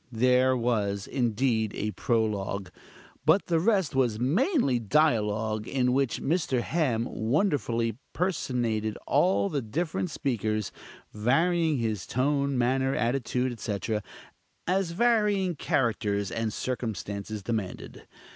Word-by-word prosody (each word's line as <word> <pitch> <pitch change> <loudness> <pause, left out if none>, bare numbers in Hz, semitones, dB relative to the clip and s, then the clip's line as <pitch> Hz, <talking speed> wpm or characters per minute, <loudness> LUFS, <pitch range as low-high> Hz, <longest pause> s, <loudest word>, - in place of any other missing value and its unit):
There 125 +2 +3
was, 105 -5 0
indeed, 115 -3 0
a 105 +1 -2
prologue, 105 -6 -1 0.5
but 160 +7 +4
the 165 -2 +1
rest 190 -3 +2
was 125 -5 +1
mainly 160 - +2
dialogue, 110 -4 +1
in 125 -2 +1
which 135 -2 +1
Mr. 150 -5 +1
Ham 125 -7 0
wonderfully 115 - 0
personated 120 - -1
all 100 +2 +3
the 140 +3 -2
different 160 +9 -2
speakers, 110 -7 -2 0.4
varying 160 +8 +2
his 110 -6 -2
tone, 140 +1 0
manner, 130 +2 +1
attitude, 125 +1 0
etc., 105 -1 -3 0.6
as 185 0 +1
varying 205 -2 +2
characters 105 -7 0
and 115 -1 -2
circumstances 105 -4 -4
demanded. 105 -3 -5
125 Hz, 110 wpm, -27 LUFS, 110-145 Hz, 0.6 s, but